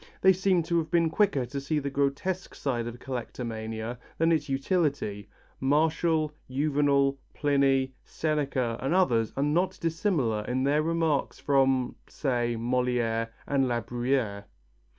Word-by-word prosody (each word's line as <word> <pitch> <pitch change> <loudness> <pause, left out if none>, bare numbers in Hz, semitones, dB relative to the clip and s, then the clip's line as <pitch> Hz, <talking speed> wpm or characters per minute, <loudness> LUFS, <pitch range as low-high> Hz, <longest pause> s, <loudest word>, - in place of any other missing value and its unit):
They 190 0 +7
seem 185 -1 +2
to 170 +1 +1
have 160 -1 -3
been 165 -1 +2
quicker 160 -10 +2
to 140 +3 -5
see 150 +3 -1
the 140 -1 -2
grotesque 140 +7 -1
side 120 -4 -2
of 120 0 -6
collectomania 115 -2 -5 0.2
than 165 +1 +3
its 150 -3 +1
utility. 135 - -1 0.3
Martial, 155 +2 +2 0.2
Juvenal, 140 0 +2 0.2
Pliny, 135 -2 +2
Seneca 140 -6 -1
and 135 +7 0
others 115 - +2
are 135 - +2
not 175 +6 +1
dissimilar 160 - 0
in 130 +1 0
their 145 +2 +3
remarks 165 -2 0
from 135 -3 +2 0.2
say, 120 -4 -1
Molière 120 -1 0 0.2
and 135 -2 +1
La 120 -1 0
Bruyère. 120 -2 -1
140 Hz, 135 wpm, -28 LUFS, 125-155 Hz, 0.3 s, They